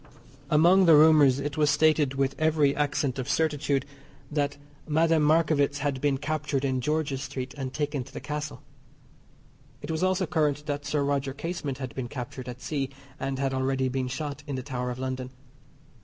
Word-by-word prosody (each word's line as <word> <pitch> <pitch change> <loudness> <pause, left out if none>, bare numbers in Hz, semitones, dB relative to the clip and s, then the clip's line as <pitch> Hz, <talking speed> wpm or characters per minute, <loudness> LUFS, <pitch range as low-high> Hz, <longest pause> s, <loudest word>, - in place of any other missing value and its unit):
Among 175 +5 +5
the 165 -2 +8
rumours 150 -4 +6
it 145 +1 -4
was 150 -1 +3
stated 150 -1 +3
with 135 0 +1
every 155 -3 +3
accent 140 -2 0
of 130 +1 -4
certitude 145 -3 +1 0.5
that 145 -1 -1 0.3
Madame 160 +1 +3
Markievicz 150 -2 +3
had 140 -2 -2
been 140 -2 +2
captured 150 -1 -2
in 130 -1 0
George's 145 -1 -1
Street, 130 -2 -5
and 135 -2 -4
taken 145 -2 -2
to - - -14
the - - -6
Castle. 150 0 -5 1.2
It - - -4
was 160 - -2
also 185 0 +2
current 150 -2 0
that 145 -1 -3
Sir 150 -1 0
Roger 140 -1 -1
Casement 145 -3 -4
had 130 -3 -6
been 130 -2 -4
captured 125 0 -7
at 125 0 -8
sea 140 -3 -2 0.3
and 135 0 -2
had 135 0 -1
already 130 0 0
been 130 0 -2
shot 145 +2 -4
in 140 - -3
the 130 - -4
Tower 125 -1 -3
of 125 - -4
London. 130 0 -4
145 Hz, 180 wpm, -27 LUFS, 130-150 Hz, 1.2 s, the